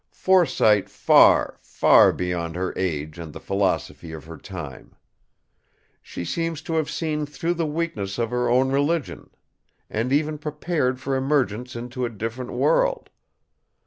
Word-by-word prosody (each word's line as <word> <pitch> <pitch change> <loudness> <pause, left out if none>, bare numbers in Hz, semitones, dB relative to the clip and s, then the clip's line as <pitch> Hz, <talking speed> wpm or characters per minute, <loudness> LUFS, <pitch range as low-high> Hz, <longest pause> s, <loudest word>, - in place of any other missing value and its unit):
Foresight 160 - +3
far, - - +4
far - - +5
beyond 85 -2 -3
her 90 0 -2
age 80 -3 -3
and 80 -2 -7
the - - -9
philosophy 95 -4 -2
of 80 - -9
her 80 +1 -9
time. 75 -9 -9 1.1
She 85 - -7
seems 165 - -3
to 165 - -4
have 160 -2 0
seen 150 -2 -2
through 165 +4 -2
the 165 -2 -2
weakness 150 -12 -3
of 115 -1 -1
her 125 0 0
own 130 +2 +3
religion, 145 +3 -1 0.6
and 115 +4 -1
even 150 +1 +1
prepared 150 -3 -2
for 135 0 -2
emergence 130 -3 -1
into 125 +2 -5
a 120 - 0
different 115 +3 -5
world. - - +1
125 Hz, 145 wpm, -23 LUFS, 95-155 Hz, 1.1 s, far